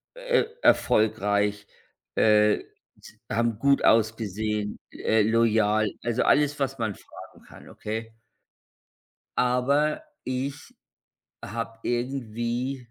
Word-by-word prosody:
e - - +1 0.2
erfolgreich, 105 - +2 0.5
äh, 105 -1 +4 0.4
s - - -15
haben 115 -1 0
gut 140 +1 +3
ausgesehen, 110 -1 +1
äh, 110 0 +1
loyal, 110 -1 +3 0.2
also, 120 -1 0
alles, 145 0 +3
was 135 -1 -2
man 110 -3 -2
fragen - - -14
kann, - - -14
okay? 110 +1 -5 1.3
Aber 140 - +1 0.2
ich 135 +3 -4 0.7
habe 115 +1 -5
irgendwie 120 +1 -2
115 Hz, 95 wpm, -26 LUFS, 110-130 Hz, 1.3 s, äh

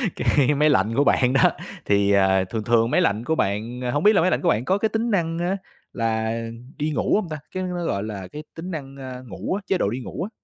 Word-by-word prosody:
cái 145 0 +2
máy 150 +2 +4
lạnh 105 -2 +2
của 140 - +4
bạn 130 -2 +3
đó, 135 - +5 0.3
thì, 100 0 +3
à, 95 -1 +4
thường 110 +4 -4
thường 115 0 +3
máy 180 - +3
lạnh 110 - +1
của 160 +6 0
bạn, 110 +2 -2
a 125 - -1
hông 145 +5 0
biết 210 - +6
là 195 - +4
máy 185 +3 +2
lạnh - - +1
của 175 - +2
bạn 120 -5 +1
có 190 - +2
cái 220 +2 0
tính 225 +2 -1
năng 165 -4 0
á 175 +3 -1 0.4
là 110 -1 -1 0.4
đi 150 +1 -1
ngủ - - +1
hông 205 -5 -1
ta? 155 - -4
Cái 185 - -3
đó 185 - -3
nó, 175 -1 -3
gọi 100 -9 -1
là, 100 -4 -6
cái 150 - -7
tính 175 +3 -6
năng, 140 -4 -6
a, 130 -1 -7
ngủ 95 - -4
á, 205 - -4
chế 190 - +2
độ 100 - +1
đi 120 +5 -3
ngủ 125 - -5
á. 200 - -4
135 Hz, 275 wpm, -23 LUFS, 110-170 Hz, 0.4 s, biết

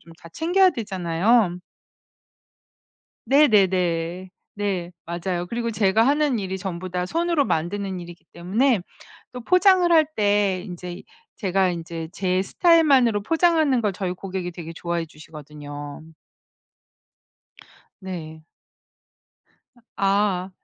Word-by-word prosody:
좀 165 - -16
다 170 - -12
챙겨야 365 +3 +3
되잖아요. 190 - +1 1.7
네네네. 185 - +2 0.2
네 195 -4 -2 0.2
맞아요. 175 +1 -3
그리고 235 0 -2
제가 215 +1 +2
하는 290 -4 +2
일이 190 -1 -4
전부 185 -1 -5
다 180 0 -2
손으로 335 - +1
만드는 190 +1 -2
일이기 175 0 -12
때문에 210 +6 +1 0.5
또 250 - -7
포장을 365 - +4
할 315 -1 +6
때 205 -3 +1
인제 180 -2 -8 0.3
제가 190 -2 +1
인제 165 -1 -6
제 185 -1 0
스타일만으로 275 - +3
포장하는 315 - +2
걸 205 -2 0
저희 185 -1 -3
고객이 185 -1 -5
되게 165 -1 -8
좋아해 170 0 -3
주시거든요. 150 -1 -10 2.0
네. 160 -4 -7 1.3
아 240 - -24
아. 195 -1 +1
190 Hz, 240 characters per minute, -23 LUFS, 175-235 Hz, 2.0 s, 할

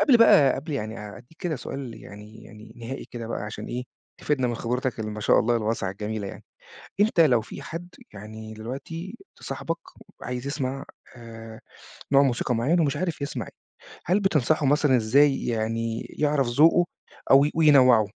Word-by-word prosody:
قبل 265 - +6
بقى 150 - +6
قبل 150 +4 -6
يعني 110 -4 -4
أ 105 -1 -9
أدّيك 125 +7 -17
كده 170 -6 -2
سؤال 130 -2 -6
يعني 105 +2 -12
يعني 110 -1 -13
نهائي 120 +3 -6
كده 115 -2 -6
بقى 115 - -4
عشان 105 - -6
إيه، 125 +1 -4 0.4
تفيدنا 135 -4 0
من 120 - -2
خبرتك 125 +1 -2
اللي 110 -1 -3
ما 105 0 -6
شاء - - +4
الله 120 +1 +2
الواسعة 110 -3 -1
الجميلة 105 +1 -4
يعني، - - -9 0.6
أنت 205 -4 +3
لو 130 -8 +5
في 110 - -9
حد 170 +2 -7 0.3
يعني 110 +2 -9
دلوقتي 140 - -7 0.2
ت - - -19
صاحبك - - -4 0.4
عايز 125 +1 -5
يسمع 135 -1 -3 0.3
آآ، 115 -1 -11 0.5
نوع 140 +1 +7
موسيقى 125 -1 0
معيّن 140 +10 +2
ومش 145 -2 +1
عارف 170 -4 -3
يسمع 140 - -4
إيه، - - -18 0.4
هل 185 +5 +2
بتنصحه 155 -5 +2
مثلًا 145 -1 +3
إزاي 135 +5 +3
يعني 115 0 -2 0.2
يعرف 145 -3 +2
ذوقه 160 +8 +4 0.4
أو 135 +1 +7
وينوّعه؟ 130 -9 +6
125 Hz, 170 wpm, -25 LUFS, 115-150 Hz, 0.6 s, نوع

